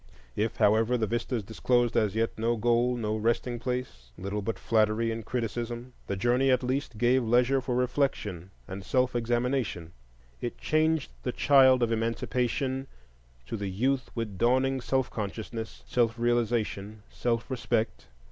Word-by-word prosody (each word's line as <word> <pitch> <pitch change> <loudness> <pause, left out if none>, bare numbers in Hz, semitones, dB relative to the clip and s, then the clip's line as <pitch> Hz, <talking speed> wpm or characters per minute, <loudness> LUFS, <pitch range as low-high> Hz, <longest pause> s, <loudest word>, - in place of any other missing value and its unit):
If, 110 +1 -1
however, 110 +4 +3
the 110 - +1
vistas 115 +1 -2
disclosed 120 +3 +1
as 105 -2 +2
yet 115 0 +1
no 115 +2 0
goal, 120 +2 +2
no 110 -2 -1
resting 115 +2 0
place, 125 - -4
little 100 +3 -3
but 110 +3 -3
flattery 110 +1 +2
and 115 0 -4
criticism, 120 +1 -4
the 100 - -1
journey 120 +6 +2
at 130 0 +3
least 130 -2 -2
gave 125 +3 +3
leisure 125 +4 +3
for 125 -1 -2
reflection 125 - -1 0.2
and 95 0 -6
self 125 +5 +1
examination; 120 -7 -1 0.5
it 120 - -4
changed 155 -1 +1
the 125 - -2
child 130 -2 +5
of 115 - +1
Emancipation 125 +3 -1 0.6
to - - -5
the 100 -2 -3
youth 130 +7 0
with 105 -5 -4
dawning 130 +2 +2
self 130 +1 0
consciousness, 110 +2 -5
self 115 -2 +1
realization, 115 -3 -1
self 120 -1 -1
respect. 115 -3 -1
120 Hz, 145 wpm, -28 LUFS, 110-125 Hz, 0.6 s, child